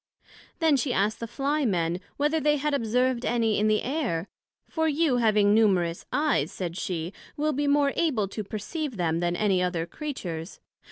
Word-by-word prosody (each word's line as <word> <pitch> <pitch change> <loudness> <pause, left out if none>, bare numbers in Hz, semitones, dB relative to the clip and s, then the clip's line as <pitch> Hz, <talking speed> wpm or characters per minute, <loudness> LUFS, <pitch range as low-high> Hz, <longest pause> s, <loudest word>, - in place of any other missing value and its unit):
Then 320 -4 +3
she 255 -1 0
asked 210 +3 +1
the 230 - -4
Fly 285 +5 -1
men, 175 -6 0 0.2
whether 300 +3 +1
they 295 0 +2
had 295 +1 -1
observed 250 0 +1
any 225 -3 +1
in 215 - +2
the 215 0 +2
Air? 240 - -2 0.4
for 320 -1 0
you 300 -3 +2
having 210 -3 +4
numerous 185 -6 +2
Eyes, 255 - +1
said 175 -3 -4
she, 175 -1 -3 0.2
will 305 +1 +1
be 290 +1 0
more 285 -1 +3
able 250 -12 +1
to 215 +2 -5
perceive 235 - -5
them, 165 -2 0
than 175 0 0
any 195 -2 +2
other 180 -2 -1
Creatures. 175 - -6
225 Hz, 175 wpm, -26 LUFS, 185-290 Hz, 0.4 s, having